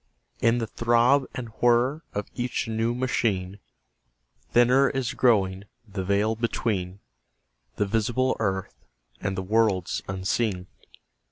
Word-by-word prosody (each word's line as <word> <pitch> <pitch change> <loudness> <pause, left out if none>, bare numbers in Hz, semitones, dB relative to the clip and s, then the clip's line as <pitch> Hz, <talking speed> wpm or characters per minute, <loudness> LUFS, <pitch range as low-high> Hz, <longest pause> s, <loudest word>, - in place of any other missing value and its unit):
In 115 +1 +3
the 115 - -1
throb 120 +4 +3
and 125 -3 -5
whir 120 +5 +3
of 105 0 -2
each 125 -2 -2
new 115 +1 -1
machine 105 -7 -1 0.9
Thinner 125 +3 +5
is 135 -3 -2
growing 100 -5 +2 0.2
the 100 -2 -4
veil 100 +3 +1
between 105 -4 -2 0.7
The 105 - 0
visible 120 +5 0
earth 95 -3 -2 0.5
and 95 -1 -2
the 95 - -2
worlds 105 -3 +1
unseen. 95 0 -1
115 Hz, 115 wpm, -26 LUFS, 95-120 Hz, 0.9 s, Thinner